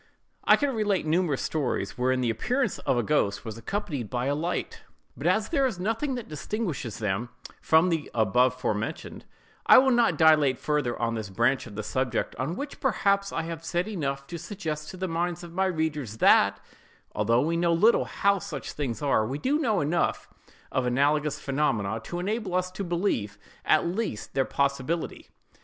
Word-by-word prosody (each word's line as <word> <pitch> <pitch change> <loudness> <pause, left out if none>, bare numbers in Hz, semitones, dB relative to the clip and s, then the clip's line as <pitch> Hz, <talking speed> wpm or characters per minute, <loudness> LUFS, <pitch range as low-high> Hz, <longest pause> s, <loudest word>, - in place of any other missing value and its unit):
I - - +7
could 285 - 0
relate 205 -6 0
numerous 155 -3 +1
stories 145 -6 -2
wherein 130 +1 +1
the 120 -2 +1
appearance 250 - -1
of 125 - 0
a 120 - +1
ghost 125 -10 0
was 110 -2 -5
accompanied 140 - -4
by 125 0 -2
a 140 - +1
light; 165 +5 -3 0.3
but - - -3
as - - +2
there 275 -5 +2
is 235 - -4
nothing 225 +9 -1
that 245 -3 -6
distinguishes 150 - -4
them 105 +2 -2 0.3
from 160 +3 +4
those 160 -3 -1
abovementioned, 115 0 0 0.4
I - - +9
will 265 +1 +6
not 235 -9 +3
dilate 150 -5 +5
further 150 -5 -1
on 115 -1 0
this 110 -3 -4
branch 120 +7 +1
of 100 - -11
the 110 - -4
subject, 125 +1 -1
on 135 +8 -2
which, 285 +6 -6
perhaps, 200 -5 +1
I 165 - -2
have 165 0 -6
said 175 +3 -1
enough 140 -9 -3
to 170 +4 -7
suggest 155 -6 -5
to 185 - -9
the 185 +1 -2
minds 175 +1 -2
of 170 -1 -10
my 190 +2 +1
readers 150 - -2
that, 100 -2 +5 0.5
although 115 +3 +2
we 165 +3 0
know 170 0 +2
little 210 +8 +4
how 200 -1 +1
such 150 -5 -6
things 140 -2 -4
are, 135 -6 +3
we 135 +4 -3
do 275 - 0
know 220 - +1
enough 160 +4 0 0.4
of 130 -1 0
analogous 145 +4 +1
phenomena 115 -7 -1
to 175 - -5
enable 200 +1 -2
us 185 0 0
to 200 - -5
believe, 170 - -1 0.3
at - - +4
least, 175 - -3
their 135 -1 +1
possibility. 140 +4 -2
155 Hz, 185 wpm, -27 LUFS, 125-185 Hz, 0.5 s, I